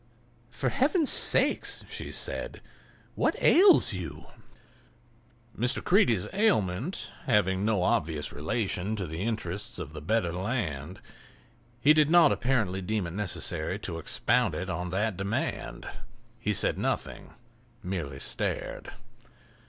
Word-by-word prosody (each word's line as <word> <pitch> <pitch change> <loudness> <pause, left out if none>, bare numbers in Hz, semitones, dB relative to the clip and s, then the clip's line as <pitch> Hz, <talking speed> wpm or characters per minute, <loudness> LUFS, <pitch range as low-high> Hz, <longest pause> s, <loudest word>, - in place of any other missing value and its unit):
"For 125 +1 -2
Heaven's 295 - +2
sake," - - +4 0.2
she - - -5
said, - - -2 0.5
"what - - +1
ails 370 - +6
you?" 80 -5 -6 1.3
Mr. 125 +3 0
Creede's 120 - +3
ailment 170 - 0
having 100 -5 +2
no 105 -4 +1
obvious 75 -4 0
relation 95 +5 -2
to 100 -3 -3
the 80 +1 -6
interests 105 -3 -3
of 75 - -6
the 75 - -7
better 90 0 0
land 90 - -3 0.8
he 145 +5 +6
did 155 -1 +3
not 175 0 +6
apparently 110 -8 0
deem 105 +1 -2
it 85 - -6
necessary 100 -3 -3
to 80 - -6
expound - - +1
it 95 +1 -4
on 90 +1 -3
that 100 +2 -1
demand; 100 +3 -3 0.5
he - - -1
said - - 0
nothing—merely 115 - -5
stared. - - -3
100 Hz, 120 wpm, -28 LUFS, 90-120 Hz, 1.3 s, ails